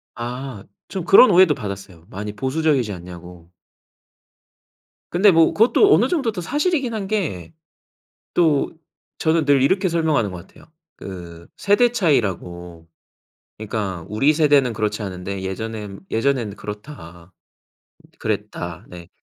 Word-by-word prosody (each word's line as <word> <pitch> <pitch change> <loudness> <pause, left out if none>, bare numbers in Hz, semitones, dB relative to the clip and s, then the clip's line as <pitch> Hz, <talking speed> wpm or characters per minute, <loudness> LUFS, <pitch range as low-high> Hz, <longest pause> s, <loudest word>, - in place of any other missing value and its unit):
아. 120 -2 -6 0.3
좀 190 -3 -4
그런 195 +6 +7
오해도 180 -3 +6
받았어요. 95 - -8
많이 105 +2 -6
보수적이지 130 -2 0
않냐고. 90 -1 -11 1.6
근데 195 +3 +5
뭐 165 -1 +4
그것도 255 - +4
어느 - - +4
정도 275 -11 0
또 180 -4 -6
사실이긴 290 - -1
한 205 -3 -4
게. 165 - -3 0.8
또 155 -5 +2 0.5
저는 160 -1 +1
늘 140 -2 +4
이렇게 190 +6 +2
설명하는 155 - +1
것 90 0 -9
같아요. - - -19 0.3
그 85 -3 -10
세대 205 +4 +3
차이라고. 90 - -1 0.7
그니까 100 -5 -4
"우리 135 +8 +3
세대는 145 -5 +3
그렇지 105 0 -2
않은데 95 0 -5
예전엔 105 +1 -6
예전에는 115 -3 0
그렇다 100 - -10 0.9
그랬다." 85 -1 -4
네. 85 -1 -11
115 Hz, 275 characters per minute, -21 LUFS, -, 1.6 s, 그런